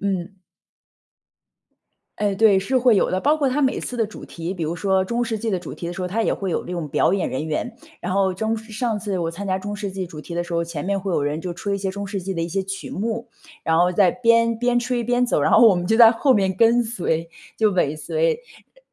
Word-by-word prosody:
嗯。 195 -1 -3 1.8
哎， 205 -2 +1
对， 205 -2 +5
是 255 +7 0
会 245 -4 +4
有 - - +2
的。 185 - 0
包 300 +2 +3
括 285 - +1
它 265 +3 0
每 265 -1 +1
次 250 - -5
的 225 -2 +1
主 210 - -11
题， 170 +2 -5
比 175 - -7
如 160 +2 -2
说 190 +2 +1
中 235 +4 -1
世 225 -2 -3
纪 230 - -2
的 190 - 0
主 180 - -8
题 170 - -6
的 175 - -4
时 185 - -6
候， 180 - -2
它 220 +5 -1
也 - - +1
会 195 -2 -3
有 - - -2
这 180 - -7
种 170 -3 -3
表 175 - +2
演 195 - 0
人 140 +4 -3
员。 160 +10 -3 0.3
然 - - -3
后 195 -1 +2
中 220 +4 -1
上 220 +1 -12 0.2
上 215 -2 -1
次 200 -2 -3
我 165 -2 -2
参 200 +4 -6
加 185 0 +1
中 205 +2 -5
世 205 -1 -4
纪 190 -1 -4
主 160 -3 -10
题 170 +2 -8
的 175 - 0
时 175 0 -7
候， 170 - +1
前 165 -3 -5
面 195 +1 -1
会 190 -1 -3
有 145 - +1
人 145 +2 -2
就 175 +1 -5
吹 200 +3 -3
一 - - -3
些 195 -1 -2
中 200 +1 -5
世 200 -1 -4
纪 190 +2 -4
的 165 - -2
一 165 - -3
些 195 +3 -1
曲 195 0 -6
目。 230 +3 -3 0.3
然 160 0 +2
后 175 +1 +4
在 180 -1 +4
边 230 -1 +3
边 245 0 +2
吹 245 0 0
边 245 +1 +1
走， 245 - +1
然 - - +2
后 - - +7
我 220 - +7
们 175 -1 -2
就 220 - +3
在 225 -1 +8
后 260 +3 +2
面 195 -3 +2
跟 230 +5 +4
随， 170 -7 -2 0.3
就 215 -2 +3
尾 155 -5 +1
随。 480 - 0 0.4
呃 - - -22
195 Hz, 295 characters per minute, -22 LUFS, 180-230 Hz, 1.8 s, 在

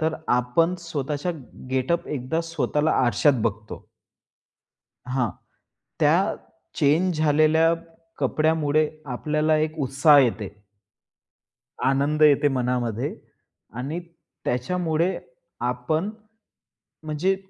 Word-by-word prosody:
तर 160 0 0
आपण 125 +9 +2
स्वतःच्या 150 0 -3 0.4
गेटअप, 130 +6 0
एकदा 145 +3 -2
स्वतःला 160 -2 -1 0.2
आरशात 130 +1 +3
बघतो. 110 -1 -4 1.2
हां. 125 -2 0 0.7
त्या - - +3 0.4
चेंज 160 +4 +2
झालेल्या 155 +2 +4 0.5
कपड्यामुळे 155 -1 +1 0.2
आपल्याला 155 +4 +1
एक 155 +1 -2
उत्साह 140 +2 +5
येते. 115 -6 +2 1.4
आनंद 140 +3 +1
येते 145 -1 +5
मनामध्ये. 125 -1 -1 0.6
आणि 135 +8 -4 0.4
त्याच्यामुळे 165 +7 0 0.5
आपण, 125 +10 -1 0.9
म्हणजे 155 +5 0
150 Hz, 80 wpm, -24 LUFS, 130-160 Hz, 1.4 s, उत्साह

